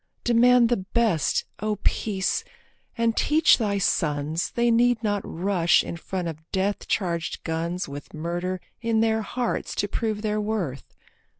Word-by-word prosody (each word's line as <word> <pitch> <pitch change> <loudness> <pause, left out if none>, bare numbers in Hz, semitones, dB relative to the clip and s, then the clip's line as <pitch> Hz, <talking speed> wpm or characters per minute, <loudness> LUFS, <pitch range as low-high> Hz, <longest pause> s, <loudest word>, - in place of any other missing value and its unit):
Demand 240 0 +5
the 240 - +2
best, 190 - +1
O 215 0 -1
Peace, 195 -3 0 0.5
and 230 -1 +1
teach 310 -1 +4
thy 205 -3 0
sons 155 -3 0
They 235 0 +3
need 240 0 +3
not 205 -2 0
rush 175 -1 +2
in - - -5
front 180 +1 -4
of 160 -2 -5
death 195 +1 -1
charged 170 -4 -2
guns 170 +2 -2
With 145 +1 -8
murder 175 +3 -3 0.2
in 230 -1 +1
their 220 0 +2
hearts 240 +3 -3
to 205 - 0
prove 215 0 -2
their 215 0 0
worth. 195 -11 -4
205 Hz, 145 wpm, -25 LUFS, 170-230 Hz, 0.5 s, Demand